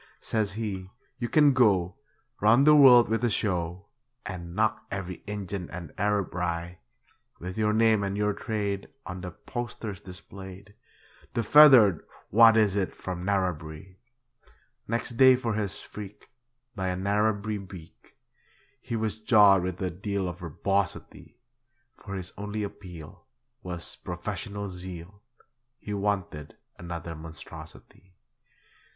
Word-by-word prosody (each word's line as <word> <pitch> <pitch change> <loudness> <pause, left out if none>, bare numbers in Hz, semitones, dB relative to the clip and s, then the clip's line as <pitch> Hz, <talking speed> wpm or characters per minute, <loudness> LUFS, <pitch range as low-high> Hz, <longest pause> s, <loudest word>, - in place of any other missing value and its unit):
Says 105 -4 -1
he, 100 -4 -4 0.3
'You 120 - -2
can 150 -2 +5
go 100 -8 +3 0.4
Round 115 +6 +5
the 150 0 +7
world 125 -5 +8
with 115 +1 -1
a 120 - +3
show, 90 -3 -2 0.4
And 85 -4 -7
knock 110 +1 0
every 95 -2 -5
Injun 100 -3 -5
and 85 -3 -8
Arab 105 -2 0
wry; 85 0 -3 0.6
With 90 +1 -7
your 105 -1 +1
name 110 -1 +3
and 100 0 -2
your 105 0 +1
trade, 100 -3 -3 0.2
On 90 -1 -6
the 90 - -5
posters 105 +1 -6
displayed, 95 +2 -11 0.6
The 115 - +1
feathered 120 - +7 0.3
what 115 +1 +7
is 105 -3 +3
it 100 -2 -1
from 90 -1 -6
Narrabri.' 90 -2 -3 0.9
Next 115 +1 -2
day 130 0 +8
for 120 -3 -2
his 105 -3 -3
freak, 105 +2 -11 0.4
By 95 -2 -2
a 90 - -1
Narrabri 105 +2 0
beak, 90 -4 -13 0.6
He 115 - -4
was 110 -1 -2
jawed 105 -4 +6
with 90 0 -4
a 90 - -1
deal 100 +2 -3
of 90 0 -6
verbosity; 90 +3 -3 0.6
For 100 -1 -8
his 90 -1 -6
only 105 +1 -3
appeal 90 -6 -10 0.3
Was 90 -2 -6
'professional 100 +3 -5
zeal' 90 +1 -9 0.6
He 105 - -7
wanted 100 -7 -3 0.2
another 85 -1 -6
monstrosity. 80 +3 -12
100 Hz, 130 wpm, -27 LUFS, 90-110 Hz, 0.9 s, world